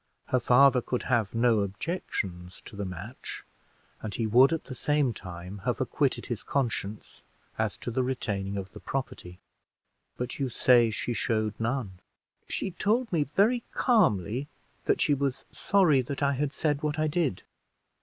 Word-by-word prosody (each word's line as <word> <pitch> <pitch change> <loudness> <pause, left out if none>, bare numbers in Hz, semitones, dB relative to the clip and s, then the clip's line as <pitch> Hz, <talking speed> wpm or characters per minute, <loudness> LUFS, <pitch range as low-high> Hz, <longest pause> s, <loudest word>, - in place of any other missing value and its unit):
Her 130 - +3
father 125 +2 +5
could 125 +1 -2
have 115 -5 0
no 115 -1 +4
objections 95 - -4
to - - -11
the 100 0 -3
match; 95 +7 -7 0.6
and 105 -3 -5
he 115 - -1
would 125 +5 +6
at 165 - -1
the 130 - -8
same 145 0 +1
time 90 +1 -8
have 95 - -2
acquitted - - 0
his - - -4
conscience 110 -6 -3 0.4
as - - 0
to - - -5
the 130 +3 +1
retaining 100 -6 -2
of 95 -1 -5
the 105 - -10
property: 90 -5 -5 0.8
but 125 +3 -4
you 135 -2 0
say 120 -1 +5
she 115 +2 -2
showed 110 -2 0
none." 115 -5 -2 0.5
"She 190 - -2
told 220 +5 0
me 155 -4 +2
very 235 +5 +4
calmly 135 - +2 0.4
that - - +2
she 145 - +3
was 140 -1 -1
sorry 175 -9 +3
that 140 +3 -4
I 140 0 +3
had 140 +1 -1
said 150 -2 0
what 150 0 -1
I 155 - +1
did." 150 - 0
125 Hz, 165 wpm, -28 LUFS, 105-145 Hz, 0.8 s, would